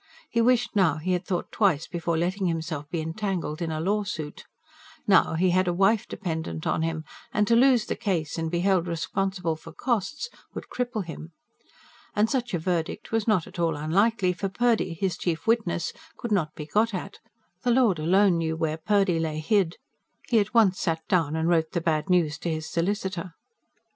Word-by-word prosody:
He 230 - +2
wished 240 -1 +2
now 185 -7 +4
he 170 +4 -2
had 180 - -1
thought 180 -2 -2
twice 180 -8 +2
before 170 -1 -2
letting 185 +3 0
himself 160 -3 -3
be 170 -2 -2
entangled 165 -2 -3
in 165 - -1
a 155 - -2
lawsuit. 185 -5 -2 0.6
Now, 190 -4 +4
he 180 +2 +3
had 185 +1 +2
a 175 - +2
wife 200 +3 +3
dependent 160 - -4
on - - +1
him, 160 -1 -2 0.3
and 210 - +2
to 230 - +4
lose 245 -2 +5
the - - -2
case, 170 -7 -1
and 160 0 -1
be 175 +1 -1
held 185 -2 +2
responsible 180 +1 -1
for 165 +1 -12
costs, 245 - -2 0.3
would - - -7
cripple 245 -5 -2
him. 165 0 -8 0.8
And 210 +2 +2
such 245 -6 -1
a - - +1
verdict 170 0 -2
was 225 -1 0
not 190 -7 +3
at 185 - -10
all 165 -2 +1
unlikely; 185 +5 +2
for 195 +2 -3
Purdy, 225 -4 +1
his 180 0 -1
chief 165 -3 -2
witness, 225 -7 +1 0.2
could 235 -3 -5
not 160 -7 +1
be 150 - -6
got 215 +6 +1
at: 195 +2 -6 0.4
the 245 - 0
Lord 235 -8 +4
alone 180 +2 +4
knew 160 -1 -1
where 160 -1 -1
Purdy 195 0 +2
lay 160 -1 -2
hid. 170 +2 +1 0.5
He 230 - +5
at 205 0 0
once 200 -5 +5
sat 160 -1 -2
down 160 -5 +2
and 160 0 0
wrote 160 -2 +2
the 170 - +1
bad 160 +1 0
news 170 -5 +2
to 170 - -3
his 155 -1 -3
solicitor. 185 -1 -2
180 Hz, 195 wpm, -26 LUFS, 160-205 Hz, 0.8 s, lose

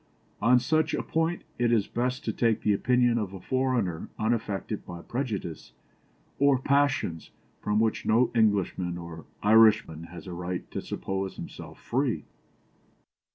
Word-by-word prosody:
On 120 +4 +6
such 155 +5 +1
a - - -2
point 165 +2 -1 0.2
it 120 -1 +2
is 110 -4 +3
best 125 +2 -2
to - - -1
take 115 -3 +1
the 105 - +2
opinion 120 +2 +3
of 100 -3 -4
a - - -7
foreigner 125 -8 -1
unaffected 110 -2 -2
by 85 -1 -9
prejudices 110 - -4 0.7
or 140 -1 +5
passions 135 - +1 0.3
from 105 0 +1
which 110 -1 +1
no 115 +2 +3
Englishman 100 -6 +1
or 85 -2 -9 0.2
Irishman 105 -7 +5
has 85 +3 -10
a 90 - -6
right 90 +1 -4
to - - -3
suppose 95 0 -4
himself - - -9
free. - - -1
110 Hz, 145 wpm, -28 LUFS, 95-125 Hz, 0.7 s, On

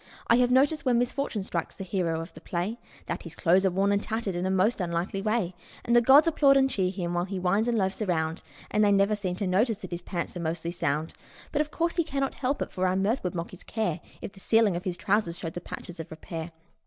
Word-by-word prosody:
I 235 - +5
have 250 0 +4
noticed 280 +4 +3
when 250 -3 +3
misfortune 245 -3 -1
strikes 170 -3 -4
the 195 - -6
hero 175 -3 -1
of 165 +1 -9
the 160 - -12
play 185 +8 -3 0.3
That - - -4
his 165 -2 -10
clothes 185 +3 +3
are - - +3
worn 195 +2 +1
and 200 0 +2
tattered 220 -3 -2
in 175 +1 -1
a - - 0
most 190 +4 +2
unlikely 175 +2 -2
way; 215 -4 0 0.3
And 240 - +2
the 240 - +7
gods 275 +7 +7
applaud 280 -4 +5
and 270 0 +4
cheer 190 -8 0
him 180 -2 -3
while 175 0 0
he 195 0 -4
whines 190 +5 +1
and 235 -1 +1
loafs 190 +1 0
around, 165 -4 -1 0.3
But 215 - +2
they 205 -1 +5
never 200 +1 +4
seem 195 -4 -2
to 195 - -3
notice 205 +4 +2
that 185 -4 -9
his 175 0 -4
pants 175 0 -4
are - - -4
mostly 170 0 -2
sound; 155 -2 -1 0.4
Yet, 300 - +2
of 300 - -2
course, 335 +2 -1
he 340 - +4
cannot 275 -3 -2
help 275 +1 -1
it, - - -9
for 185 -1 0
our 185 - +1
mirth 205 +7 +1
would 180 -1 -2
mock 170 0 -4
his 185 - -12
care 215 -7 -2 0.2
If - - -5
the 195 - -15
ceiling 220 -2 +3
of 175 +3 -4
his 180 -2 -2
trousers 195 -4 0
showed 165 -1 -5
the 175 - -5
patches 175 0 -8
of 160 - -6
repair. 160 +1 -6
195 Hz, 260 wpm, -27 LUFS, 175-230 Hz, 0.4 s, the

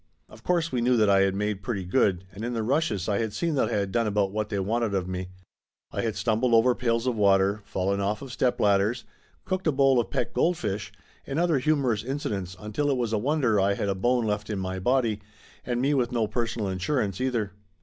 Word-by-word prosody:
Of 110 +1 -16
course 170 -2 +1
we 125 -2 0
knew 125 +1 +3
that 105 -2 +4
I 100 - +5
had 95 0 +2
made 105 0 -2
pretty 100 -3 -3
good, 90 0 +1
and 105 - -8
in 120 +1 -2
the 115 -2 -1
rushes 115 - 0
I 100 -2 +1
had 110 -2 -2
seen 170 -2 -1
that 140 - +1
I - - -3
had 100 -1 -1
done 115 0 +1
about 100 -2 +1
what 105 0 -2
they 100 - -2
wanted 110 +2 0
of 90 -2 -1
me. 95 0 -4 0.6
I - - -2
had 115 -2 -2
stumbled 115 +1 +2
over 120 +2 +5
pails 115 -1 0
of 125 -2 0
water, 100 0 +3
fallen 100 +1 -1
off 105 +5 -1
of 135 - -8
stepladders, 110 -2 +1 0.4
cooked 185 -1 -2
a - - +4
bowl 135 -2 +4
of 120 - -1
pet 120 - -2
goldfish, 110 - -1 0.4
and 135 - -3
other 165 -4 +2
humorous 130 -7 +1
incidents 100 -9 -4
until 105 +8 -2
it 135 - +1
was 120 -3 -1
a 110 - +2
wonder 130 -4 +1
I 100 +1 +2
had 100 - -2
a - - +2
bone 120 +5 +1
left 105 0 -2
in 105 - -2
my 95 0 -3
body, 115 -1 +1 0.4
and 120 -1 -2
me 140 +4 +2
with 125 -4 +1
no 115 -3 +1
personal 115 -1 -2
insurance 100 +2 -1
either. 120 -6 -1
110 Hz, 230 wpm, -26 LUFS, 100-125 Hz, 0.6 s, I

